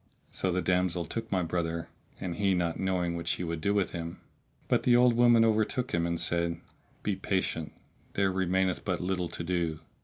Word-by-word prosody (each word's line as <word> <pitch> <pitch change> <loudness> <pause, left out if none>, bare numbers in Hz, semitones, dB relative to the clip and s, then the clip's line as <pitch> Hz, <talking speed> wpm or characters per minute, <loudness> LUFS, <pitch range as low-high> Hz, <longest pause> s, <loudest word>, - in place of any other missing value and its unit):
So 95 - -1
the 90 +1 0
damsel 90 -2 +1
took 115 -1 -5
my 95 -2 +2
brother 85 0 -2 0.3
(and 90 -2 -4
he 100 -2 +2
not 85 -2 -1
knowing 90 -2 0
what 85 0 -5
she 90 - 0
would 85 -2 -3
do 100 - +1
with 100 -2 +1
him); 85 0 -5 0.5
but - - +3
the 120 - +4
old 125 0 +6
woman 120 -1 +6
overtook 110 +4 +1
him 85 0 +1
and 85 -1 -1
said, 85 0 0 0.4
"Be 105 - 0
patient; 95 -5 -1 0.4
there 95 -1 +2
remaineth 95 0 +1
but 90 -2 -1
little 90 -1 -1
to - - -5
do." 85 -3 -1
90 Hz, 190 wpm, -29 LUFS, 85-100 Hz, 0.5 s, old